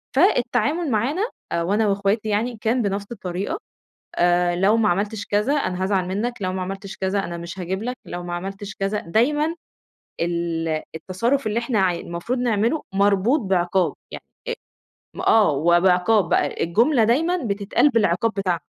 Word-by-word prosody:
فالتعامل 320 -2 +2
معانا 270 - 0 0.3
آآ، 170 - 0
وأنا 205 +4 +1
وأخواتي 200 +2 0
يعني 225 +3 -1
كان 235 +3 +1
بنفس 200 -1 -2
الطريقة، 190 -3 -4 0.6
آآ، 175 0 +3
لو 200 +5 +3
ما 220 -2 +3
عملتش 205 +4 -1
كذا 210 +7 +1
أنا 185 -10 -1
هازعل 190 -2 0
منك، 225 +6 -2
لو 185 0 -1
ما 185 0 -3
عملتش 195 +2 -6
كذا 190 +1 0
أنا 170 - -5
مش 170 +2 -8
هاجيب 190 +4 -3
لك، 250 +1 -3
لو 175 0 -5
ما 175 0 -4
عملتش 195 +3 -6
كذا 195 +2 -1
دايمًا 295 - +1 0.7
ال 170 -1 -1 0.3
التصرف 230 - -1
اللي 215 +2 0
إحنا 235 -3 -1
ع 185 -2 +3
المفروض 170 +9 -4
نعمله 235 +4 +1
مربوط 200 +7 +3
بعقاب 180 -4 +1 0.2
يع - - -6 0.3
أ - - 0 0.7
آه، 215 -7 +5
وبعقاب 180 +6 +3
بقى، - - +1
الجملة 230 - +3
دايمًا 325 +10 +2
بتتقال 200 +7 +2
بالعقاب 225 -3 +2
بتاعها. 185 -5 -1
200 Hz, 155 wpm, -22 LUFS, 180-230 Hz, 0.7 s, آه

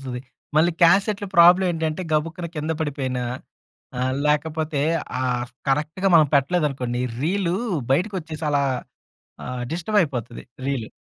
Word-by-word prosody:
అదొటొస్తది. 125 -2 -5 0.4
మళ్ళీ 165 +3 +5
క్యాసెట్‌లో 200 +4 +4
ప్రాబ్లమ్ 180 +2 +7
ఏంటంటే, 160 +1 -2
గబుక్కున 165 +3 -1
కింద 155 +2 -1
పడిపోయిన 135 -4 -2 0.8
ఆహ్, 130 0 0
లేకపోతే 150 0 0 0.4
ఆ - - 0 0.4
కరెక్ట్‌గా 155 +7 0
మనం 155 -2 +6
పెట్టలేదనుకోండి 135 -4 0 0.2
రీలు 180 +2 0 0.4
బయటికొచ్చేసి 165 -1 -1
అలా 145 -1 +2 0.8
ఆహ్, 125 -1 -4
డిస్టర్బ్‌యిపోతది 160 - -1 0.2
రీల్. 130 -6 -2
155 Hz, 110 wpm, -23 LUFS, 140-175 Hz, 0.8 s, ప్రాబ్లమ్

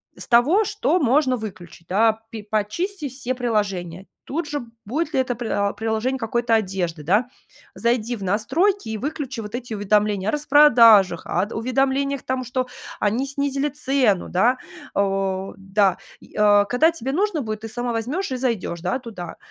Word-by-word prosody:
с - - -9
того, 275 - +4
что 370 -5 +1
можно 265 -1 +3
выключить, 180 -6 -9
да, 220 +3 +2
пи 225 -2 -7
почисти 280 - -2
все 255 0 -4
приложения, 195 -7 -2 0.2
тут 315 +2 -3
же 295 -3 -3 0.2
будет 300 +9 -2
ли - - +3
это, 255 -1 0
приа 210 -4 -1
приложение 225 +5 -1
какой-то 235 0 0
одежды, 185 -7 0
да. 210 +10 +2 0.4
Зайди 235 0 0
в 205 - -8
настройки 260 - +1
и 220 - -3
выключи 280 -3 -4
вот 210 +1 -6
эти 245 -2 -6
уведомления 205 -1 +1
о - - +1
распродажах, 245 - +6
ад 190 +5 -1
уведомлениях 270 +3 0
тому, 260 0 -2
что 250 +1 -2 0.3
они 225 +6 +1
снизили 280 +1 -1
цену, 265 -8 +1
да? 240 +8 +2 0.3
О 195 -1 -1
да. 195 -1 +1 0.2
И, - - -19
а, 205 -1 +5
когда 250 +10 +3
тебе 270 -5 -4
нужно 370 0 0
будет, 215 -3 -4
ты 225 - -6
сама 240 +2 -3
возьмешь 260 - -2
и - - -1
зайдешь, 230 -9 -2
да, 185 +9 -1
туда. 205 -8 -8
235 Hz, 165 wpm, -22 LUFS, 205-270 Hz, 0.4 s, распродажах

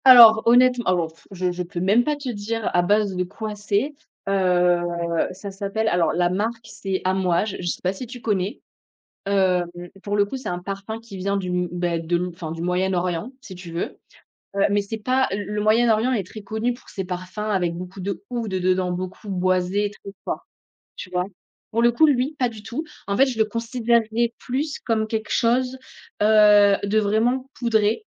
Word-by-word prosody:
Alors 235 -4 +10
honnêtem 250 +1 +5
alors 175 -3 +2
pff, 165 - -24
je 185 -1 -1
je 175 0 -4
peux 175 0 -6
même 200 +7 +4
pas 300 +2 0
te 285 -2 -8
dire 225 0 -2
à 175 - +4
base 205 +1 +2
de 180 - 0
quoi 215 +4 -6
c'est. 210 +7 -1 0.3
Heu, 180 -2 +3 0.5
ça 195 +2 -8
s'appelle 200 +3 -2
alors 175 -5 +2
la 175 0 +2
marque 225 +5 -2
c'est 190 -1 -4
Amouage, 185 +1 +1
je 175 - -4
sais - - -2
pas 185 +1 +1
si 240 +6 -7
tu 245 +1 -9
connais? 200 -3 -1 0.7
Hem, 190 -3 +2 0.4
pour 205 0 -2
le 205 - +4
coup 235 - -5
c'est 255 -5 -6
un 175 - -2
parfum 195 +4 -6
qui 225 -4 -11
vient 200 +2 -1
du 185 -2 -4
m 180 0 0
beh, 175 -1 -1
de 165 +1 0
m 180 +1 -1
enfin 165 -2 -6
du 165 - -7
Moyen-Orient, 180 +3 -1
si 190 - -10
tu 180 -2 -10
veux, 170 - -4 0.6
heu, 200 - +2
mais 205 0 +2
c'est 220 +3 -5
pas 255 +4 +2
le 205 +1 -2
le 210 - -1
Moyen-Orient 225 +2 +3
est 205 -7 -1
très 215 +2 -10
connu 220 +4 -1
pour 245 - -18
ses 190 - -4
parfums 180 +2 -6
avec 180 -4 0
beaucoup 180 +2 -8
d'oud 195 +2 -3 0.3
dedans, 185 -1 +1
beaucoup 185 +3 -6
boisés 185 +2 +1
et - - -4
très 200 -1 -11
forts, - - -4 0.5
tu 185 - -8
vois? 180 0 -1 0.5
Pour 230 - +1
le 240 0 +5
coup, 275 +7 +5
lui 280 0 +1
pas 250 -3 +1
du 220 -2 -11
tout, 240 +9 -4 0.2
en 200 - 0
fait 270 - +6
je 255 -4 -3
le 220 - +5
considérerais 230 0 0
plus 280 +4 -2
comme 220 -2 0
quelque 220 -1 -3
chose, 250 +2 +2 0.4
heu, 210 -1 +6
de 205 +2 +2
vraiment 235 +6 +1
poudré, 220 - +1
205 Hz, 200 wpm, -23 LUFS, 185-230 Hz, 0.7 s, Alors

